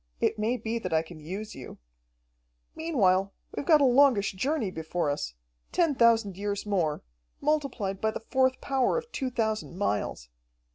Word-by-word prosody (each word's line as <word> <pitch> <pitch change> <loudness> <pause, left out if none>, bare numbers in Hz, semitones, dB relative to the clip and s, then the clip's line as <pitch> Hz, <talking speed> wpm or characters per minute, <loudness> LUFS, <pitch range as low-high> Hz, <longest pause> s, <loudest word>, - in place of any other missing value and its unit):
It - - +1
may 230 +4 +1
be 230 +1 -3
that - - -5
I 160 0 +3
can 165 -1 -12
use 190 +8 -6
you. 130 - -10 1.0
"Meanwhile 195 - +2 0.2
we've 285 - -4
got 310 -3 +6
a - - +6
longish 255 -5 +5
journey 230 +1 -1
before 160 -2 -2
us, - - -4 0.4
ten 335 -4 +2
thousand 230 -6 +3
years 205 0 -3
more, 175 -7 0 0.4
multiplied 250 -11 -1
by 220 - +2
the 225 - -6
fourth 260 0 +3
power 270 - +1
of 470 0 -5
two 265 -2 -2
thousand 220 -6 -2
miles. 105 - -2
220 Hz, 160 wpm, -28 LUFS, 185-260 Hz, 1.0 s, got